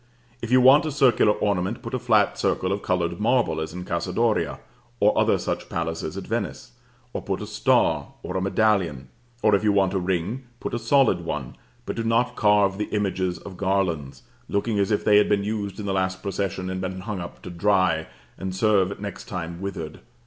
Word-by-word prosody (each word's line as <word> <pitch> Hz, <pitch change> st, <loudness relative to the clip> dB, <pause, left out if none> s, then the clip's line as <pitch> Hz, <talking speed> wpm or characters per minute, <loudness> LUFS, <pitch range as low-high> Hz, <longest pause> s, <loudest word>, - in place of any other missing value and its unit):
If 115 Hz, -, -4 dB
you 130 Hz, +1 st, +5 dB
want 140 Hz, +5 st, +6 dB
a -, -, -2 dB
circular 125 Hz, -6 st, +4 dB
ornament, 100 Hz, +1 st, -1 dB
put -, -, -7 dB
a 130 Hz, -, 0 dB
flat 110 Hz, -5 st, +3 dB
circle 95 Hz, -, 0 dB
of 100 Hz, +1 st, -1 dB
colored 85 Hz, -2 st, -1 dB
marble, 115 Hz, -5 st, +2 dB
as 80 Hz, -, -4 dB
in 90 Hz, +1 st, -6 dB
the -, -, -12 dB
Casa 85 Hz, -1 st, -2 dB
Doria 115 Hz, -2 st, +1 dB, 0.4 s
and 105 Hz, +1 st, +5 dB
other -, -, +3 dB
such -, -, -4 dB
palaces 80 Hz, -2 st, -3 dB
at -, -, -5 dB
Venice; -, -, -4 dB, 0.4 s
or -, -, -3 dB
put -, -, -3 dB
a -, -, -5 dB
star, -, -, +2 dB, 0.2 s
or -, -, -5 dB
a 95 Hz, -, 0 dB
medallion, 95 Hz, -9 st, +1 dB, 0.3 s
or 105 Hz, -, +4 dB
if 100 Hz, -, +3 dB
you 105 Hz, -, +4 dB
want 100 Hz, -2 st, +2 dB
a 95 Hz, -, +1 dB
ring, 95 Hz, +8 st, -2 dB
put -, -, -5 dB
a 120 Hz, -, -1 dB
solid 115 Hz, -6 st, +3 dB
one, 75 Hz, -6 st, -4 dB, 0.3 s
but -, -, -4 dB
do 115 Hz, -, -2 dB
not 120 Hz, +2 st, +1 dB
carve 105 Hz, -2 st, +3 dB
the 105 Hz, -, 0 dB
images 95 Hz, -3 st, -1 dB
of 95 Hz, -3 st, -10 dB
garlands, 95 Hz, -, -1 dB, 0.3 s
looking 105 Hz, +1 st, 0 dB
as 100 Hz, -, +1 dB
if 105 Hz, -, 0 dB
they 105 Hz, -1 st, +6 dB
had 105 Hz, -, +4 dB
been 100 Hz, -1 st, +2 dB
used 105 Hz, -1 st, -3 dB
in 105 Hz, -, -5 dB
the 100 Hz, -, -1 dB
last 95 Hz, -1 st, -1 dB
procession, 95 Hz, -1 st, -2 dB
and 95 Hz, 0 st, -3 dB
been 95 Hz, 0 st, -4 dB
hung 105 Hz, -1 st, -4 dB
up 85 Hz, -, -9 dB
to -, -, -7 dB
dry, 90 Hz, -3 st, +2 dB, 0.3 s
and 95 Hz, -1 st, -4 dB
serve 100 Hz, -2 st, +2 dB
next 100 Hz, -2 st, -6 dB
time 85 Hz, -2 st, -5 dB
withered. 85 Hz, -5 st, -5 dB
100 Hz, 210 wpm, -24 LUFS, 90-105 Hz, 0.4 s, want